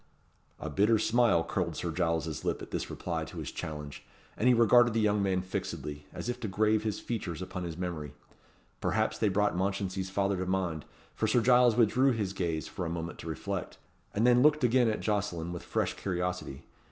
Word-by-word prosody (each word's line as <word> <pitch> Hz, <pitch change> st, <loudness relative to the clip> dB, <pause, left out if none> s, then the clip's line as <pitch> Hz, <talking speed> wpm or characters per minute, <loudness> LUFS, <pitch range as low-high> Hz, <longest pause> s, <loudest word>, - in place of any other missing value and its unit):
A -, -, -5 dB
bitter 105 Hz, +9 st, +3 dB
smile 110 Hz, -6 st, +3 dB
curled 85 Hz, -1 st, -2 dB
Sir 85 Hz, -, -3 dB
Giles's 80 Hz, -2 st, -1 dB
lip -, -, -1 dB
at -, -, -10 dB
this -, -, -3 dB
reply -, -, -3 dB
to -, -, -10 dB
his -, -, -5 dB
challenge, 75 Hz, -2 st, -6 dB, 0.3 s
and 115 Hz, -, +1 dB
he 125 Hz, -, +7 dB
regarded 120 Hz, 0 st, +5 dB
the -, -, +3 dB
young 105 Hz, -1 st, +2 dB
man 95 Hz, -2 st, +1 dB
fixedly, 75 Hz, -5 st, -5 dB
as -, -, -6 dB
if 120 Hz, -, -2 dB
to 110 Hz, -, -3 dB
grave 105 Hz, +2 st, +2 dB
his 110 Hz, -2 st, -2 dB
features 95 Hz, -9 st, -4 dB
upon 90 Hz, -1 st, -5 dB
his 80 Hz, -1 st, -6 dB
memory. 85 Hz, -6 st, -4 dB, 0.6 s
Perhaps -, -, 0 dB
they 110 Hz, -, +3 dB
brought 105 Hz, 0 st, +1 dB
Mounchensey's 95 Hz, 0 st, -1 dB
father 100 Hz, 0 st, 0 dB
to 90 Hz, 0 st, -3 dB
mind, 90 Hz, -5 st, -1 dB, 0.3 s
for 110 Hz, -, -1 dB
Sir 120 Hz, +3 st, +3 dB
Giles 125 Hz, -1 st, +5 dB
withdrew 125 Hz, +3 st, +4 dB
his 100 Hz, -4 st, -2 dB
gaze 85 Hz, -5 st, -2 dB
for -, -, -5 dB
a 85 Hz, -, -2 dB
moment 85 Hz, 0 st, -5 dB
to -, -, -8 dB
reflect, 100 Hz, +3 st, -4 dB, 0.3 s
and 110 Hz, +3 st, +1 dB
then 125 Hz, 0 st, +6 dB
looked 150 Hz, 0 st, +4 dB
again 125 Hz, -1 st, +4 dB
at 105 Hz, -, -2 dB
Jocelyn 95 Hz, -5 st, -1 dB
with 85 Hz, -, -5 dB
fresh -, -, -1 dB
curiosity. 90 Hz, -6 st, -3 dB
95 Hz, 200 wpm, -30 LUFS, 85-110 Hz, 0.6 s, he